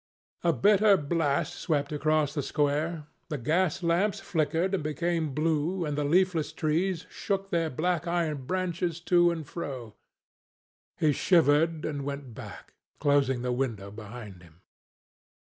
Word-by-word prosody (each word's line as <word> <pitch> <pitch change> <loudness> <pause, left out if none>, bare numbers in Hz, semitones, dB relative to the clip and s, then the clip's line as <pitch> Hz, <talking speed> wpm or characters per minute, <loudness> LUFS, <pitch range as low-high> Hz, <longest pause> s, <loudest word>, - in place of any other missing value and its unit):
A 170 - +4
bitter 200 - +5
blast 145 -2 0
swept 150 -4 -1
across 155 -1 +1
the 150 - -1
square. 150 +3 -1 0.2
The 150 - -2
gas 165 +7 0
lamps 175 +5 +1
flickered 165 +3 0
and 185 -6 0
became 160 -1 -1
blue, 165 +3 0
and 150 -1 -2
the 145 - 0
leafless 170 +1 +2
trees 170 +3 -1
shook 195 -1 -3
their 165 -2 +1
black 170 +4 -1
iron 160 -6 -1
branches 175 -2 -1
to 175 0 +4
and 165 -3 -3
fro. 135 -8 -6 1.0
He 155 - +3
shivered 160 -1 +3
and 145 -2 -3
went 140 -3 -5
back, - - -10 0.3
closing 135 -3 +2
the 125 - -1
window 115 -6 -3
behind 105 -3 -9
him. 85 0 -19
155 Hz, 140 wpm, -28 LUFS, 140-175 Hz, 1.0 s, bitter